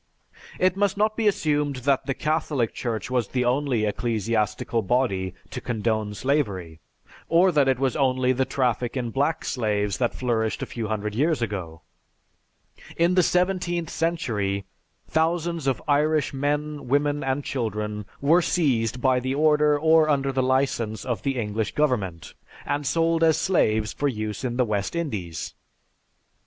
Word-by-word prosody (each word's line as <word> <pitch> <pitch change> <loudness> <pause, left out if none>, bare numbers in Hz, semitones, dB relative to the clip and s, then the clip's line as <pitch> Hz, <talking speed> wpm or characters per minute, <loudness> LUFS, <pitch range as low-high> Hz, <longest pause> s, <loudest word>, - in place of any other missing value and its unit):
It 185 0 +2
must 200 -1 +1
not 215 +1 +2
be 225 -2 +1
assumed 150 -7 +1
that 140 -1 +2
the 135 - -1
Catholic 150 -6 -1
Church 115 0 -4
was 125 -4 +1
the 125 +2 -1
only 125 -3 +1
ecclesiastical 110 0 -1
body 95 -5 0 0.2
to - - -5
condone 110 -2 -1
slavery, 100 - -1 0.5
or 175 +3 +5
that 145 -4 +3
it 130 -2 +3
was 135 -1 0
only 130 -2 +2
the 130 +1 +1
traffic 125 -1 -1
in 120 -2 -2
black 145 +5 0
slaves 105 -5 -1
that 120 -2 0
flourished 115 -3 -1
a - - -2
few 115 -2 -5
hundred 105 -1 -3
years 150 +6 +1
ago. 90 -7 -5 1.1
"In 170 +2 +3
the 180 - +5
seventeenth 180 -1 0
century, 105 - -1 0.4
thousands 165 -1 0
of 135 - 0
Irish 150 0 +2
men, 145 +1 -2
women 145 +2 +1
and 135 +2 -1
children, 105 -5 -3 0.2
were 160 +6 +5
seized 125 -9 0
by 130 -1 +3
the 130 +2 -2
order 150 0 +4
or 160 0 +4
under 140 -2 +1
the 130 0 0
license 130 -5 0
of 120 -3 -2
the 135 -2 -1
English 110 -1 -2
government, 105 - -1 0.3
and 145 -1 -2
sold 165 +2 +2
as 160 -1 +4
slaves 110 - +1
for 145 - -1
use 110 -3 -3
in 120 -2 -2
the 125 - +3
West 105 - -2
Indies. 100 - -4
130 Hz, 155 wpm, -25 LUFS, 110-150 Hz, 1.1 s, or